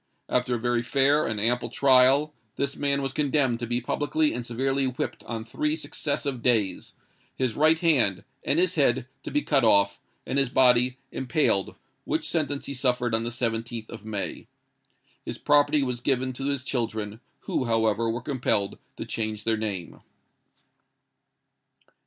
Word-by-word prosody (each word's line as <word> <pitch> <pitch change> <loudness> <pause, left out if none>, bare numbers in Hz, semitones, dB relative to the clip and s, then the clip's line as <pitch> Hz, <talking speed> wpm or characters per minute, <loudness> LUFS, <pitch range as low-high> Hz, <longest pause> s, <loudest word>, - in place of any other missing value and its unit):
After 125 0 +1
a - - -3
very 120 0 0
fair 140 +4 +2
and 110 -2 -2
ample 120 +2 0
trial, 135 +4 +4 0.2
this 140 0 -2
man 140 -1 0
was 135 -1 -2
condemned 140 -5 +1
to 120 - -4
be 120 +1 0
publicly 150 +4 0
and 120 - -3
severely 135 +3 -1
whipped 130 -1 -4
on 115 -2 -5
three 150 +6 -1
successive 140 -4 -3
days, 115 -6 0 0.4
his 130 -3 -1
right 155 +2 +4
hand 130 - +2 0.2
and 140 - +2
his 180 +1 +3
head 135 -7 +2 0.2
to - - -6
be 295 - 0
cut 140 -4 +2
off, 100 -3 +3 0.3
and 135 - 0
his 135 -2 +2
body 125 0 +4
impaled: 125 -6 0 0.3
which - - -2
sentence 145 -4 -1
he 140 - -4
suffered 125 -3 0
on 110 0 +1
the - - -1
17th 115 -1 -3
of 115 -2 -9
May. 105 -2 -5 0.7
His - - -6
property 145 0 +3
was 125 -2 -3
given 130 0 0
to 135 +2 -3
his 140 -2 -1
children, 110 -4 -3 0.2
who, 130 - -2
however, 115 -1 +1
were 120 +2 -3
compelled 115 -7 -1 0.2
to - - -5
change 110 -1 -3
their 115 0 +1
name." 100 -6 -4
125 Hz, 160 wpm, -26 LUFS, 115-140 Hz, 0.7 s, trial